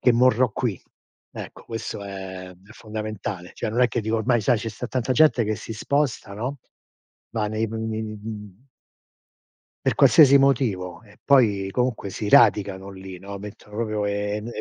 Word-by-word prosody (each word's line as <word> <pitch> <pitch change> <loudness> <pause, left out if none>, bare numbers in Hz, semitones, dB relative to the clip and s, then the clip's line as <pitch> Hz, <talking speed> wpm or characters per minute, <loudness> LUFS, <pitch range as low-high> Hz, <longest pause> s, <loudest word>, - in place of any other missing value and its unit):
che 125 - +5
morrò 125 0 +4
qui. 110 -5 -3 0.5
Ecco, - - -9
questo 115 -3 -5
è 95 -2 -7
è 95 +4 -17
fondamentale. 110 -4 -6
Cioè - - -3
non 120 +3 0
è 125 - +6
che 120 0 -2
dico 110 +1 -1
ormai 120 +1 +2
sai 120 +2 +2
ce 115 +1 -4
sta 110 - -6
tanta 130 0 -1
gente 130 -4 +4
che 110 +1 0
si 110 +1 -7
sposta, 120 -3 -1
no, 125 +7 -4 0.7
va 110 -2 -1
nei 110 +1 -1
p - - -9
nei 110 0 -3
mhmm 105 +1 -8 1.2
Per - - +2
qualsiasi 140 -3 +7
motivo. 115 -9 +1
E 100 -2 -20
poi, 105 -8 +4
comunque 125 -4 -1
si 105 +2 -4
radicano 100 -3 +4
lì, 95 -1 -9
no, 100 +2 -8
mettono 105 +1 -11
proprio 110 -2 -1
ehm 105 +1 -2
e 120 - -5
110 Hz, 175 wpm, -24 LUFS, 100-120 Hz, 1.2 s, qualsiasi